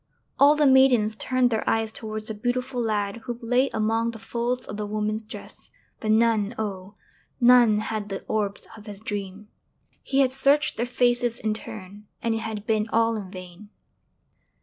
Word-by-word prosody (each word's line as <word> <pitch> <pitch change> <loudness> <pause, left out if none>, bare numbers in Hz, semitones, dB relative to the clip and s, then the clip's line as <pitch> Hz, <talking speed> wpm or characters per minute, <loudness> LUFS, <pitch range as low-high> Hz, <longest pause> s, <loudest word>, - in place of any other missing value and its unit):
All 285 +2 +7
the 300 0 +3
maidens 260 -5 +5
turned 255 +2 +1
their 220 - 0
eyes 225 -1 0
towards 215 -1 -5
the - - -2
beautiful 245 +3 -2
lad 210 -2 -1
who 240 -2 -4
lay 250 +3 +1
among 225 +1 0
the 230 - -7
folds 235 +3 -3
of 205 - -6
the 210 0 -4
woman's 215 +1 -2
dress 215 -1 -11 0.3
but 215 - -4
none, 220 0 +2
oh! 200 -2 -5 0.4
none 240 -3 +6
had 215 -1 -3
the 195 - -5
orbs 205 -2 -2
of 215 0 -14
his 205 -2 -3
dream! 205 -1 -6 0.5
He 275 0 +1
had 260 -2 +3
searched 280 +3 +2
their 235 +2 -1
faces 245 -1 +1
in 215 -1 -1
turn, 205 -1 -9 0.2
and 230 -1 +1
it 225 - -1
had 220 -2 -5
been 220 0 0
all 230 0 +2
in 200 -4 -6
vain. 185 +2 -11
220 Hz, 175 wpm, -25 LUFS, 210-245 Hz, 0.5 s, All